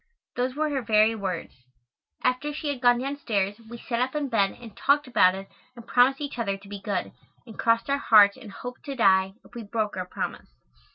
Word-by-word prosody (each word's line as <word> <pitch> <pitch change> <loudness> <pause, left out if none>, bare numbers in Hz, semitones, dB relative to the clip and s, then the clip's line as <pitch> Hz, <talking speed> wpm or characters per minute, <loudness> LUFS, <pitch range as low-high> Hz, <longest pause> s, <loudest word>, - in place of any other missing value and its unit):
Those 250 +1 -1
were 305 0 0
her 275 -2 -1
very 220 -1 +3
words. 190 -6 -4 0.7
After 255 +4 0
she 295 0 -4
had 275 -4 -4
gone 245 -1 +5
downstairs 230 -7 -2
we 235 - -8
sat 235 0 -3
up 255 +3 -1
in 290 -2 -1
bed 200 -5 +1
and 230 -4 -12
talked 290 +1 +2
about 210 -7 +4
it 195 0 -8 0.3
and 235 -2 -12
promised 250 +3 +3
each 285 -4 -5
other 200 -4 -1
to 200 0 -17
be 200 0 -8
good, 200 -3 -3 0.3
and 225 -3 -13
crossed 230 0 +2
our 280 0 0
hearts 205 -6 +6
and 250 -6 -12
"hoped 245 +5 -9
to 275 - -5
die" 190 -4 +3
if - - -20
we 240 - -6
broke 215 -1 -2
our 185 -1 -4
promise. - - -5
235 Hz, 215 wpm, -26 LUFS, 200-260 Hz, 0.7 s, hearts